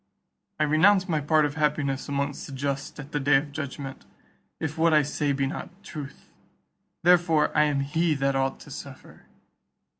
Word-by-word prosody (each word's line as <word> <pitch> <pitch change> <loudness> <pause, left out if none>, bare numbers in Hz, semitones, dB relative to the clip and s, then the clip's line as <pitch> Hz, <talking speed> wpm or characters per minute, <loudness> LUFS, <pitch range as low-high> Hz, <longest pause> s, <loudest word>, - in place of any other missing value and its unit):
I - - +3
renounce 180 +6 +4
my 155 -4 0
part 155 +1 +3
of 145 - -2
happiness 145 -3 -1
amongst 140 0 -2
the 140 - -9
just 140 +1 -3
at 145 +1 -9
the 145 - -1
day 145 +1 +3
of 145 +2 +1
judgment, 140 -2 -6 0.6
if 160 -1 -3
what 165 -1 +3
I 150 - +5
say 145 0 -1
be 135 0 0
not 135 - -5
truth; 145 -6 -9 0.7
therefore 170 -3 +4
I 150 - +5
am 145 -2 0
he 160 +3 +1
that 135 0 0
ought 135 0 0
to - - -12
suffer." - - -10
145 Hz, 175 wpm, -26 LUFS, 140-155 Hz, 0.7 s, I